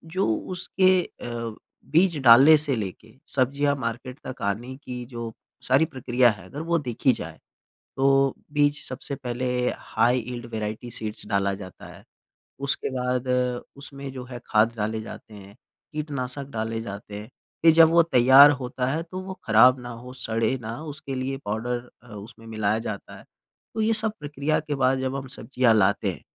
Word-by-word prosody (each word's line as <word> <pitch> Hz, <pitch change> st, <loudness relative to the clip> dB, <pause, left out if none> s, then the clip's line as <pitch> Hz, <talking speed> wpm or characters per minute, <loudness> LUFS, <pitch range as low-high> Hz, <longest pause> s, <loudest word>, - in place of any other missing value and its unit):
जो 190 Hz, -, +2 dB
उसके 185 Hz, -, +1 dB
अ, 115 Hz, -5 st, -6 dB, 0.3 s
बीज 170 Hz, 0 st, +3 dB
डालने 130 Hz, +6 st, +9 dB
से 145 Hz, -3 st, +3 dB
लेके 110 Hz, +1 st, -6 dB
सब्ज़ियाँ 140 Hz, +2 st, +1 dB
मार्केट 125 Hz, +1 st, -5 dB
तक 130 Hz, -, -7 dB
आने 115 Hz, +6 st, -3 dB
की 125 Hz, -3 st, -7 dB
जो 115 Hz, -2 st, -6 dB, 0.4 s
सारी 135 Hz, +5 st, +4 dB
प्रक्रिया 125 Hz, -3 st, +2 dB
है, 95 Hz, -3 st, -10 dB
अगर 140 Hz, +11 st, -7 dB
वो 170 Hz, +1 st, +1 dB
देखी 130 Hz, -1 st, +1 dB
जाए, -, -, -8 dB, 0.6 s
तो 135 Hz, 0 st, +3 dB, 0.2 s
बीज 145 Hz, 0 st, +2 dB
सबसे 130 Hz, +2 st, -5 dB
पहले 125 Hz, -1 st, -4 dB, 0.3 s
हाई 120 Hz, +3 st, +1 dB
यील्ड 120 Hz, 0 st, -6 dB
वेराइटी 110 Hz, +2 st, -4 dB
सीड्स 110 Hz, -1 st, -4 dB
डाला 100 Hz, 0 st, +1 dB
जाता 95 Hz, -2 st, -11 dB
है, -, -, -15 dB, 0.6 s
उसके 140 Hz, 0 st, -1 dB
बाद, 125 Hz, 0 st, -1 dB, 0.5 s
उसमें 140 Hz, -1 st, -9 dB
जो 130 Hz, -1 st, -7 dB
है 125 Hz, -1 st, -8 dB
खाद 110 Hz, +2 st, +3 dB
डाले 110 Hz, +1 st, -2 dB
जाते 110 Hz, 0 st, -11 dB
हैं, 100 Hz, 0 st, -13 dB, 0.4 s
कीटनाशक 140 Hz, -3 st, -4 dB
डाले 115 Hz, -1 st, -3 dB
जाते 100 Hz, -1 st, -8 dB
हैं। 105 Hz, -, -9 dB, 0.3 s
फ़िर 165 Hz, 0 st, +7 dB
जब 165 Hz, 0 st, +7 dB
वो 170 Hz, +1 st, +5 dB
तैयार 135 Hz, -1 st, +7 dB
होता 125 Hz, 0 st, -2 dB
है, 155 Hz, +3 st, -1 dB
तो 180 Hz, +2 st, -7 dB
वो 190 Hz, 0 st, -6 dB
ख़राब 125 Hz, +4 st, +6 dB
ना 120 Hz, 0 st, -8 dB
हो, 120 Hz, +2 st, -9 dB
सड़े 115 Hz, 0 st, -1 dB
ना, 110 Hz, 0 st, -5 dB
उसके 150 Hz, -3 st, -6 dB
लिए 130 Hz, +1 st, -3 dB
पाउडर 120 Hz, +4 st, -3 dB
अ, -, -, -18 dB
उसमें 110 Hz, +2 st, -11 dB
मिलाया 110 Hz, -1 st, 0 dB
जाता 105 Hz, -3 st, -6 dB
है। -, -, -14 dB, 0.5 s
तो 220 Hz, -, -2 dB
ये 225 Hz, +1 st, +2 dB
सब 220 Hz, 0 st, +2 dB
प्रक्रिया 145 Hz, 0 st, -1 dB
के 150 Hz, -1 st, -4 dB
बाद 130 Hz, 0 st, +2 dB
जब 130 Hz, 0 st, -2 dB
हम 135 Hz, -1 st, -5 dB
सब्ज़ियाँ 125 Hz, -3 st, +2 dB
लाते 100 Hz, -1 st, +2 dB
हैं, -, -, -11 dB
125 Hz, 175 wpm, -25 LUFS, 115-140 Hz, 0.6 s, डालने